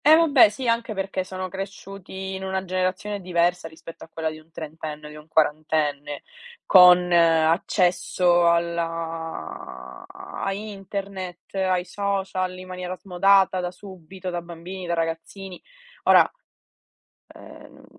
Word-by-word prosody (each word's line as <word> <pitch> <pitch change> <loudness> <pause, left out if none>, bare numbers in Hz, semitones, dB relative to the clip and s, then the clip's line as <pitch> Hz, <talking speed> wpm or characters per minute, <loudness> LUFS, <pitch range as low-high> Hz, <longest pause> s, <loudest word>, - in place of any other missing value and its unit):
Eh, 310 +2 +9
vabbè, 295 -9 +6
sì, 240 +5 -5
anche 230 -1 0
perché 190 -1 -2
sono 185 0 -5
cresciuti 195 0 -7
in 190 0 -5
una 190 0 -2
generazione 185 +2 -2
diversa 175 -1 +1
rispetto 165 +1 -12
a - - -13
quella 160 -1 -2
di 155 - -10
un 155 +1 -22
trentenne 155 -1 -7
o - - -8
di - - -11
un 150 0 -13
quarantenne, 150 -2 0 0.4
con 180 -1 +7
accesso 170 +1 +3
alla 165 - -3
a 380 - -5
internet, 195 -2 -7
ai 185 -2 0
social, 190 -2 -2
in 185 - -9
maniera 180 0 -5
smodata 190 0 +3
da 180 0 -2
subito 185 0 -9
da 175 0 -3
bambini, 175 +2 -8
da 170 - 0
ragazzini. 165 +3 -4 0.4
Ora, - - +7 1.1
ehm - - -14
180 Hz, 130 wpm, -24 LUFS, 165-195 Hz, 1.1 s, Eh